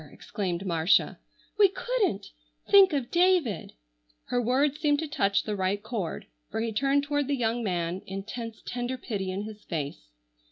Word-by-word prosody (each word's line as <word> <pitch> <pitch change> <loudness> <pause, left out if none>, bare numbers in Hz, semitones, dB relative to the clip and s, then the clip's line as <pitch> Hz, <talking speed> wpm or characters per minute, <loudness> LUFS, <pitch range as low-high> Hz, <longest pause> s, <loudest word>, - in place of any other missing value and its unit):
exclaimed 185 -2 -4
Marcia, 170 0 +2 0.4
"we 400 -2 +7
couldn't! 390 - -1 0.4
Think 395 -2 +7
of 275 -5 -2
David." 345 - +2 0.6
Her 245 - +1
words 270 +5 +1
seemed 295 -2 +3
to 320 +1 -3
touch 200 -9 +1
the 210 - -3
right 195 +1 -1
chord, 215 -6 -4 0.2
for - - -3
he 225 0 -1
turned 275 +5 +2
toward 290 -1 -1
the 285 - +1
young 235 0 0
man, 175 -2 -1
intense, 220 +4 -6
tender 245 +1 -3
pity 200 -7 -4
in 190 +2 -3
his 215 0 -9
face. 145 - -5
230 Hz, 160 wpm, -28 LUFS, 195-285 Hz, 0.6 s, we